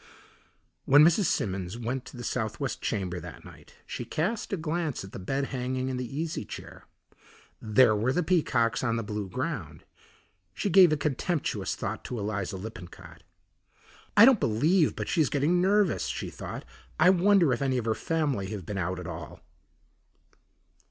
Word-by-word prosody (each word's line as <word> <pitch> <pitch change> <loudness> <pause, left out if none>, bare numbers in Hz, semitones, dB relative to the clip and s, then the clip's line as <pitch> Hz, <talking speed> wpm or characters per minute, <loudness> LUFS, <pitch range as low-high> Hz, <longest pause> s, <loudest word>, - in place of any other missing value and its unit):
When 145 +2 +7
Mrs. 175 +4 +4
Simmons 95 - -1
went 120 +2 -3
to - - -11
the 120 - -7
southwest 120 +3 -3
chamber 95 -4 -2
that 85 0 -10
night - - -15
she - - -5
cast 175 - -2
a 195 - 0
glance 160 - -2
at 95 - -10
the - - -7
bed 135 +9 -2
hanging 130 +1 -2
and 125 - -3
the 125 +2 -5
easy 160 -1 -3
chair. - - -10 0.8
There 110 +1 +4
were 115 +5 +1
the 175 +6 +1
peacocks 125 -11 +1
on 115 -3 +1
the 115 - -2
blue 105 -1 -4
ground. 120 - -4 0.7
She 200 - -1
gave 180 -2 +7
a 155 - +2
contemptuous 150 +3 -1
thought - - -4
to 125 - -4
Eliza 100 -2 -3
Lippincott. 95 -3 -10 1.0
"I 210 - +10
don't 260 -4 +6
believe 155 - +2
but - - -4
she's 155 -7 +2
getting 155 +5 +2
nervous," 200 +2 +2
she - - -4
thought. - - -7 0.3
"I 180 - +7
wonder 185 -5 +4
if 120 - -3
any 130 -2 +1
of 120 - -2
her 110 - +2
family 145 -9 -1
have 105 -5 -6
been 100 +1 -4
out 90 0 -2
at 90 - -7
all." 80 -4 -8
130 Hz, 170 wpm, -28 LUFS, 105-165 Hz, 1.0 s, I